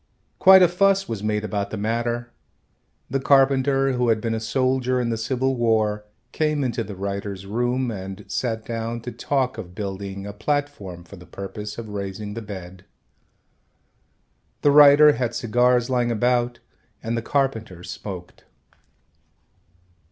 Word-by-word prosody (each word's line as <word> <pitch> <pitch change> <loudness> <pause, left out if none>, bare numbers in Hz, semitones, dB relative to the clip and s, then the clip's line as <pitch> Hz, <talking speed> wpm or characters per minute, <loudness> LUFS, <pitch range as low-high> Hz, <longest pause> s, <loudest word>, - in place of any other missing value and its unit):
Quite 190 0 +8
a - - +7
fuss 195 +2 +2
was 110 -3 -4
made 105 0 -1
about 100 -2 -2
the 110 - -5
matter. 120 +3 -2 0.8
The 135 +2 -1
carpenter, 135 0 +3
who 125 -1 +1
had 110 -1 +3
been 115 +1 -2
a 110 - -1
soldier 130 +2 0
in 120 -1 -1
the - - 0
Civil 130 +3 0
War, 110 -3 +1 0.3
came 150 -2 0
into 120 -2 -1
the 105 -2 -8
writer's 100 0 -5
room 120 +4 -1
and 95 0 -7
sat 110 -3 -2
down 115 0 -4
to 120 +2 -6
talk 130 -1 -1
of 90 0 -9
building 100 -1 -5
a 100 - -6
platform 110 -8 -3
for 100 +3 -13
the 90 -1 -14
purpose 100 +3 -7
of 115 -2 -7
raising 105 +1 -5
the 115 - -5
bed. 95 -3 -9 1.8
The 145 - +5
writer 145 +1 +8
had 120 -3 -2
cigars 120 +1 +2
lying 125 -2 +1
about 120 +1 +1 0.5
and 115 +1 -2
the 115 - -1
carpenter 110 -9 -2
smoked. 90 -2 -8
115 Hz, 150 wpm, -23 LUFS, 105-130 Hz, 1.8 s, Quite